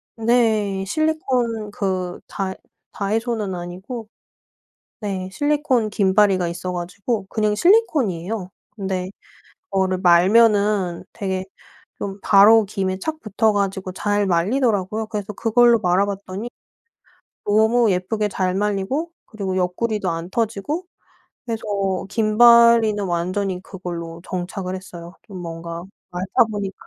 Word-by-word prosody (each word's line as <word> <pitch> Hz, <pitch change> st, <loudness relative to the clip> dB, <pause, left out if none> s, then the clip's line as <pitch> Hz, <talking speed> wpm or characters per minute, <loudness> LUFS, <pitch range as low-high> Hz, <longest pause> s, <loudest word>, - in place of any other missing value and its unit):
네. 220 Hz, -4 st, +1 dB
실리콘 250 Hz, -, -1 dB
그 185 Hz, -3 st, -2 dB
다 190 Hz, -1 st, -3 dB, 0.4 s
다이소는 215 Hz, -1 st, -2 dB
아니고 190 Hz, +7 st, -7 dB, 0.9 s
네 190 Hz, -3 st, -4 dB
실리콘 290 Hz, -4 st, +1 dB
김발이가 195 Hz, -3 st, +3 dB
있어 180 Hz, +1 st, -5 dB
가지고 190 Hz, +5 st, -3 dB
그냥 215 Hz, -1 st, 0 dB
실리콘이에요. 225 Hz, -, +2 dB, 0.3 s
근데 190 Hz, -3 st, -3 dB, 0.6 s
그거를 190 Hz, -1 st, +1 dB
말면은 200 Hz, 0 st, +4 dB
되게 190 Hz, -3 st, -3 dB, 0.5 s
좀 200 Hz, 0 st, -5 dB
바로 215 Hz, +2 st, +7 dB
김에 190 Hz, -2 st, -2 dB
착 310 Hz, +9 st, -4 dB
붙어 215 Hz, -1 st, +1 dB
가지고 195 Hz, -2 st, -2 dB
잘 205 Hz, +2 st, 0 dB
말리더라고요. 210 Hz, +2 st, +1 dB
그래서 210 Hz, -2 st, -5 dB
그걸로 235 Hz, +2 st, +4 dB
말아봤더니 195 Hz, +4 st, -1 dB, 1.0 s
너무 220 Hz, +3 st, +3 dB
예쁘게 210 Hz, +4 st, -1 dB
잘 185 Hz, -2 st, -1 dB
말리고 210 Hz, -, -1 dB
그리고 195 Hz, -4 st, -4 dB
옆구리도 195 Hz, +3 st, -1 dB
안 165 Hz, +2 st, -5 dB
터지고 230 Hz, -, -2 dB, 0.6 s
그래서 230 Hz, -2 st, -3 dB, 0.5 s
김발이는 230 Hz, -1 st, +5 dB
완전히 185 Hz, +2 st, -2 dB
그걸로 170 Hz, -3 st, -7 dB
정착을 185 Hz, +1 st, -4 dB
했어요. 175 Hz, -2 st, -10 dB
좀 195 Hz, -4 st, -8 dB
뭔가 170 Hz, 0 st, -6 dB, 0.3 s
말다 185 Hz, +7 st, +2 dB
보니까 200 Hz, -2 st, -4 dB
200 Hz, 270 characters per minute, -21 LUFS, 185-225 Hz, 1.0 s, 바로